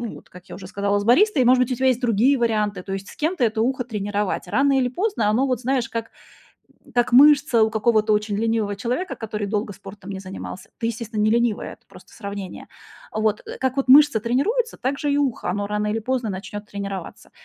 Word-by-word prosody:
вот - - -15
как 180 0 -14
я - - -8
уже 185 -1 -10
сказала, 200 0 0
с - - -3
баристой. 295 - +4
И, - - +3
может 250 +1 +5
быть, 255 - -5
у - - +1
тебя 260 +2 +1
есть 255 -1 +2
другие 245 +4 +3
варианты, 210 -5 0
то 195 - -5
есть 195 0 -5
с - - -13
кем-то 315 -2 0
это 220 -1 +1
ухо 255 +1 0
тренировать. 205 -4 -3
Рано 275 +8 +2
или 255 -2 +2
поздно 260 - -1
оно 245 +6 +2
вот, 255 -3 0
знаешь, 255 -1 0
как 230 -1 -5 0.8
как 240 0 +1
мышца 280 -3 +6
у 220 - +3
какого-то 215 0 +2
очень 210 -1 0
ленивого 220 -2 0
человека, 250 - -3
который 210 -2 -4
долго 205 0 -2
спортом 195 0 -11
не 190 -1 -5
занимался. 190 0 -8
Ты, 230 - -2
естественно, 225 -1 -4
не 215 - +3
ленивая, 235 -1 0
это - - -32
просто - - -17
сравнение. 200 -3 -7 0.4
Вот, 215 -1 0
э, - - -8
как 260 0 -1
вот 275 -1 -1
мышца 280 -3 +7
тренируется, 410 - 0
так 265 +3 -2
же 290 -1 -1
и - - +1
ухо, 270 -10 -1
оно 205 +2 -2
рано 210 0 -1
или 215 +2 -1
поздно 245 -1 -2
начнет 205 +2 -7
тренироваться. 200 -2 -7
225 Hz, 220 wpm, -22 LUFS, 205-255 Hz, 0.8 s, мышца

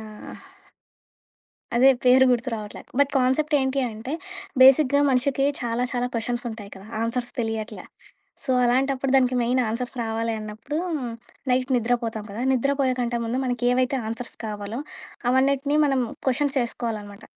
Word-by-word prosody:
ఆహ్ 215 -1 -10 1.4
అదే 265 +3 +7
పేరు 255 +1 +7
గుర్తు 245 +1 +1
రావట్లే. 210 -1 -7 0.2
బట్ 285 0 +4
కాన్సెప్ట్ 290 +4 +1
ఏంటి 265 +1 0
అంటే 225 +6 -7 0.5
బేసిక్‌గా 275 +1 +6
మనిషికి 265 +2 +1 0.2
చాలా 235 0 -1
చాలా 245 0 0
క్వెషన్స్ 240 +1 -2
ఉంటాయి 210 -3 -9
కదా! 195 +2 -12 0.2
ఆన్సర్స్ 240 +1 -2
తెలియట్లే. 225 -1 -4 0.6
సో, - - -2
అలాంటప్పుడు 265 +2 +1
దానికి 255 -1 +3
మెయిన్ 250 +2 +2
ఆన్సర్స్ 245 +3 -3
రావాలి 225 0 -1
అన్నప్పుడు 215 +7 -6 0.7
నైట్ 255 +1 +1
నిద్రపోతాం 230 -2 -1
కదా! 220 +5 -5
నిద్రపోయేకంటే 255 -2 +1
ముందు 235 +3 -1
మనకి 245 -1 -2
ఏవైతే 255 +1 +1
ఆన్సర్స్ 230 +2 -5
కావాలో 210 +2 -5 0.5
అవన్నిటిని 275 +2 +2
మనం 270 -2 +1 0.2
క్వెషన్స్ 275 +2 +1
చేసుకోవాలనమాట. 215 -4 -4
245 Hz, 130 wpm, -24 LUFS, 225-265 Hz, 1.4 s, అదే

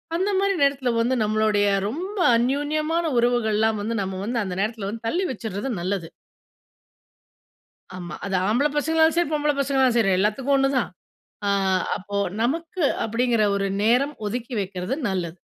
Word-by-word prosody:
அந்த 385 +4 0
மாதிரி 395 0 +1
நேரத்தில 275 -3 +2
வந்து 245 +3 +1
நம்மளுடைய 215 -1 +2 0.2
ரொம்ப 370 - -5 0.2
அன்யோன்யமான 300 +7 0
உறவுகள்லாம் 220 -3 +2
வந்து 230 +2 -2
நம்ம 190 -1 -4
வந்து 235 +2 -2
அந்த 185 -2 -4
நேரத்தில 215 -1 -2
வந்து 225 +1 -7
தள்ளி 360 +9 0
வச்சிடுறது 220 +1 -4
நல்லது. 185 -2 -2 1.9
ஆமா. 175 -1 -7
அது 195 -1 -2
ஆம்பள 245 +7 +2
பசங்களாலும் 320 +1 +3
சரி, 345 -4 +2
பொம்பள 295 0 +2
பசங்களாலும் 265 -3 +2
சரி 195 -4 +3
எல்லாத்துக்கும் 220 +8 +1
ஒண்ணுதான். 270 -3 +1 0.6
அ - - +2 0.5
அப்போ, 200 +1 -5 0.2
நமக்கு 330 +7 -1 0.2
அப்டிங்கிற 230 0 +1
ஒரு 200 0 0 0.2
நேரம் 255 +6 +3
ஒதுக்கி 240 +3 -4
வைக்கிறது 185 +5 -3
நல்லது. 175 -2 -3
240 Hz, 140 wpm, -23 LUFS, 210-285 Hz, 1.9 s, பசங்களாலும்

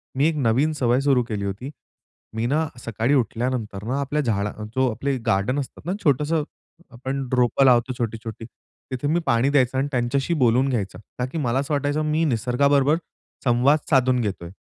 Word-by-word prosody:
मी 140 +3 +3
एक 165 - 0
नवीन 135 +4 +2
सवय 125 -4 +2
सुरू 135 -3 +3
केली 105 -4 -3
होती. 100 +7 -4 0.7
मी 110 +1 -1
ना 155 +5 +1
सकाळी 115 +3 -1
उठल्यानंतर 115 -4 -1
ना 135 +3 -1
आपल्या 145 +2 -1
झाडा 105 -6 0
अ, 105 - -9
जो 130 0 +3
आपले 135 +5 -2
गार्डन 110 +5 +1
असतात 140 +1 -7
ना 175 - -2
छोटंसं 150 +2 +2 0.5
आपण 130 +2 -4
रोपं 125 +2 +3
लावतो 125 0 +4
छोटी-छोटी, 115 -1 -4 0.5
तिथे 130 +2 -2
मी 160 +4 +2
पाणी 120 +1 +2
द्यायचा 130 -2 +2
आणि 135 +2 +1
त्यांच्याशी 130 +5 0
बोलून 125 +3 +3
घ्यायचा. 110 -7 -2 0.2
का 125 - +1
की - - -4
मला 130 -4 0
असं 140 +2 -2
वाटायचं, 145 +1 0
मी 160 +2 +1
निसर्गाबरोबर 140 +4 +2 0.5
संवाद 130 +5 +4
साधून 130 -3 +3
घेतोय. 95 -6 -4
130 Hz, 175 wpm, -23 LUFS, 115-140 Hz, 0.7 s, लावतो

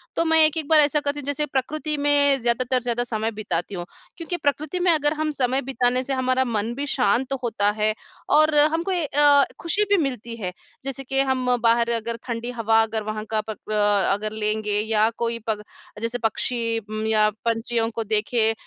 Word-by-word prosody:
तो 330 - +1
मैं 320 0 +4
एक-एक 310 -1 -1
बार 315 0 +5
ऐसा 295 +1 +2
करती 290 0 -2
हूँ 285 - -8
जैसे 285 +1 -1
प्रकृति 300 +3 -2
में 285 -1 +3
ज़्यादातर, 245 +2 0
ज़्यादा 240 0 -1
समय 220 0 -1
बिताती 185 -1 -3
हूँ 175 -1 -5 0.3
क्योंकि 350 +1 -4
प्रकृति 305 +4 -1
में - - +6
अगर 295 -2 +2
हम 310 0 -2
समय 255 +2 +2
बिताने 255 -1 0
से 275 - -3
हमारा 260 0 +1
मन 225 -1 -2
भी 280 +2 -3
शांत 250 +2 +1
होता 210 -3 +1
है 215 0 +2 0.5
और 310 0 +3
हमको 325 +5 +2
ये 350 -4 0
अ, 285 0 +5 0.2
खुशी 370 +5 +1
भी 405 - +4
मिलती 235 -3 -6
है। 180 -2 -3 0.3
जैसे 270 0 -5
कि 270 +1 -1
हम 260 -1 0 0.2
बाहर 230 0 +4 0.2
अगर 230 0 -2
ठंडी 235 0 -3
हवा 225 -2 +2
अगर 220 -1 -3
वहाँ 215 0 -4
का 220 - +1
पक 215 0 -8
अ 205 -2 +2
अगर 210 +2 -3
लेंगे 215 -1 -1
या 220 0 +2
कोई 230 0 -1
पग 215 -2 -1 0.4
जैसे 230 +2 -2
पक्षी 230 0 -1
उम्म, 215 0 -5
या 215 -1 +3 0.2
पंछियों 230 0 0
को 230 - -1
देखें, 220 +1 +1
245 Hz, 195 wpm, -23 LUFS, 220-285 Hz, 0.5 s, में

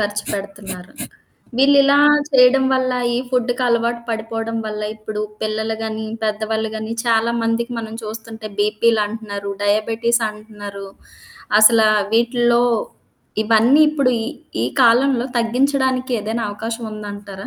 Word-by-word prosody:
ఖర్చు 205 0 -2
పెడుతున్నారు. 195 -2 -7 0.6
వీళ్ళు 275 +2 +5
ఇలా 280 +1 +4 0.3
చేయడం 265 0 +5
వల్ల, 255 -1 0 0.2
ఈ - - +1
ఫుడ్డుకి 250 0 0
అలవాటు 235 0 0
పడిపోవడం 225 0 -3
వల్ల 210 0 -5
ఇప్పుడు 215 0 -6 0.2
పిల్లలు 220 +1 -2
గానీ, 220 0 -4 0.2
పెద్దవాళ్ళు 220 +1 -1
గానీ 220 +1 -5
చాలా 230 0 +2
మందికి 230 +2 -1
మనం 220 -1 -6
చూస్తుంటే 220 0 -8
బీపీలంటున్నారు, 210 -1 0
డయాబెటిస్ 225 +3 +1
అంటున్నరు. 205 -2 -10 0.7
అసల 225 +1 +7 0.3
వీటిల్లో 240 +1 +3 0.8
ఇవన్నీ 225 +6 +4
ఇప్పుడు 280 -4 +1
ఈ, - - -3 0.4
ఈ - - +1 0.2
కాలంలో 245 +1 +4
తగ్గించడానికి 260 +2 0
ఏదైనా 220 +2 -3
అవకాశం 225 +3 -5
ఉందంటారా? 205 -2 -8
225 Hz, 115 wpm, -19 LUFS, 215-240 Hz, 0.8 s, అసల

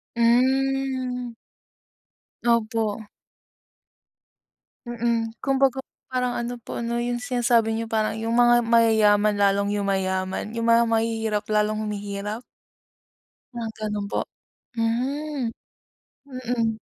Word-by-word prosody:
Hmm. 255 +1 +1 1.1
Opo. 225 -2 +1 1.8
Mm, 230 -1 -1
kumbaga 270 -1 +2 0.2
parang 250 -1 -1
ano 240 +1 -3
po 235 - -7
'no, 235 0 -2
yung 240 0 -1
sinasabi 240 -3 +2
nyo, 230 0 -2
parang 220 -1 0
yung 225 +1 -3
mga 240 0 +5
mayayaman 215 -3 +4
lalong 200 0 +2
yumayaman, 190 +1 -1
yung 230 0 -1
mga 230 0 +5
mahihirap 225 -2 0
lalong 215 0 +1
humihirap? 205 +1 -4 1.1
Mga 235 -1 -4
gano'n 210 -1 -3
po? - - 0 0.5
Hmm. 255 +3 -1 0.8
Mm. 245 -4 -2
230 Hz, 95 wpm, -24 LUFS, 215-245 Hz, 1.8 s, mga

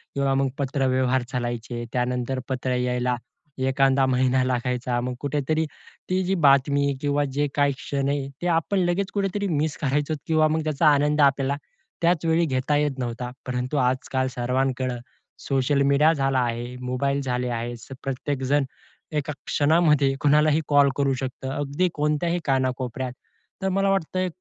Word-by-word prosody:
किंवा 140 -1 +1
मग 135 0 +2
पत्रव्यवहार 130 -2 +1
चालायचे. 120 -1 -3
त्यानंतर 125 +1 -1
पत्र 130 -1 -1
यायला 125 0 0 0.4
एखादा 135 0 +3
महिना 130 0 +2
लागायचा. 125 -1 -1
मग 125 +1 -3
कुठेतरी 150 +3 0 0.4
ती 185 +1 +1
जी 190 +1 0
बातमी 140 +1 +4
किंवा 145 0 +1
जे 145 +1 +1
काही 145 -1 +3
क्षण 140 0 -2
आहे, 140 -1 -1
ते 175 - -1
आपण 165 +4 +1
लगेच 185 +2 0
कुठेतरी 200 0 -1
मिस 155 -3 -1
करायचो 145 +2 0
किंवा 155 -1 +4
मग 155 +1 0
त्याचा 155 0 +2
आनंद 150 +1 +3
आपल्याला 140 0 +3 0.5
त्याच 170 -1 +2
वेळी 165 +1 +3
घेता 130 0 0
येत 145 -2 0
नव्हता. 125 0 -3 0.2
परंतु 125 +3 -2
आजकाल 130 0 0
सर्वांकडे 125 0 -1 0.5
सोशल 140 +1 +2
मीडिया 140 +3 +4
झाला 135 -3 +1
आहे, 120 0 -2
मोबाईल 140 +3 -1
झाले 125 -2 -1
आहेत. 120 +1 -5
प्रत्येक 135 +1 -3
जण 145 -1 +4 0.5
एका 150 -1 -2
क्षणामध्ये 150 -2 +3
कुणालाही 150 +1 +4
कॉल 145 -1 +5
करू 140 -1 +2
शकतं, 130 0 -5
अगदी 145 +5 0
कोणत्याही 150 +4 0
कानाकोपऱ्यात. 130 -1 -1 0.5
तर 190 - 0
मला 195 +1 +1
वाटतंय 185 -1 0
140 Hz, 145 wpm, -24 LUFS, 130-150 Hz, 0.5 s, कॉल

